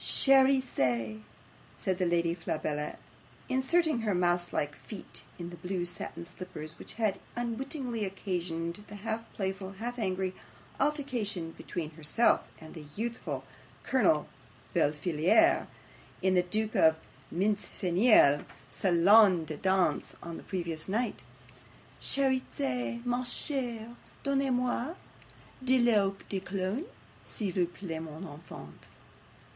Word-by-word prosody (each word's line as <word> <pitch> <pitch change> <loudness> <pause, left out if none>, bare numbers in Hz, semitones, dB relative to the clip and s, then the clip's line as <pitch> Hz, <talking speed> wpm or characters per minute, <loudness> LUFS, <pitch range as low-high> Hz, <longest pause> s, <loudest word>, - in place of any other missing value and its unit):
'"Cherizette," 255 - +3 0.6
said 185 0 -1
the 180 - +2
Lady 170 -1 +2
Flabella, 155 -3 -2 0.5
inserting 270 +2 +2
her 215 -4 0
mouse 175 0 +2
like 145 0 -1
feet 205 -4 -10
in 175 0 -6
the - - -7
blue 180 +1 -2
satin 170 -1 -5
slippers, 170 -3 -8
which - - -9
had 215 -4 0 0.2
unwittingly 240 0 -3
occasioned 180 -2 -3
the 210 - -9
half 225 +2 -4
playful 190 0 -3
half 240 +5 -5
angry 190 -2 -1 0.5
altercation 240 - -1
between 160 -1 -5
herself 160 +9 +2
and 160 -1 -11
the 150 -3 -9
youthful 235 +2 -3 0.4
Colonel 185 - +3 0.5
Befillaire, 165 - +3 0.6
in 190 0 +4
the 180 - +5
Duke 215 +4 -1
of 160 0 +6 0.4
Mincefenille's 190 - +4 0.3
SALON 185 0 +6
DE 155 -1 -5
DANSE 190 +1 +1
on 170 -1 -6
the - - -8
previous 170 -3 -3
night. 230 +5 -1 0.8
"CHERIZETTE, 235 - 0
MA 245 +1 0
CHERE, 240 -3 -2 0.3
DONNEZ 275 -1 +1
MOI 250 +5 0 0.7
DE 260 0 +4
L'EAU 210 -5 +4
DE 195 - -2
COLOGNE, 195 - -2 0.4
S'IL 205 -4 -3
VOUS 180 -1 +1
PLAIT, 165 -5 -5
MON 160 +2 -7
ENFANT." 160 -2 -10
190 Hz, 120 wpm, -31 LUFS, 170-235 Hz, 0.8 s, of